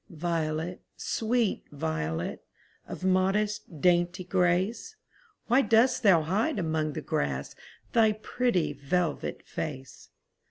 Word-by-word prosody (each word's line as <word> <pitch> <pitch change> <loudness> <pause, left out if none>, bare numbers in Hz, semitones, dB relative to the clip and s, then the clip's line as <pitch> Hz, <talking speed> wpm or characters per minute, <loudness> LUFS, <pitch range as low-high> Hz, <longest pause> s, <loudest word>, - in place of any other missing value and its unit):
Violet, 165 0 -2 0.2
sweet 230 -1 0
violet, 80 - -3 0.4
Of - - -7
modest, 190 -2 +1
dainty 175 0 +2
grace, 185 - 0 0.5
Why 245 +4 +4
dost 250 +1 +3
thou 185 -8 +5
hide 210 - 0
among 155 -4 -1
the - - -4
grass 70 -1 -2 0.4
Thy 220 -2 +5
pretty 210 -7 0
velvet 150 +3 -2
face? 135 -4 -6
180 Hz, 105 wpm, -28 LUFS, 155-215 Hz, 0.5 s, thou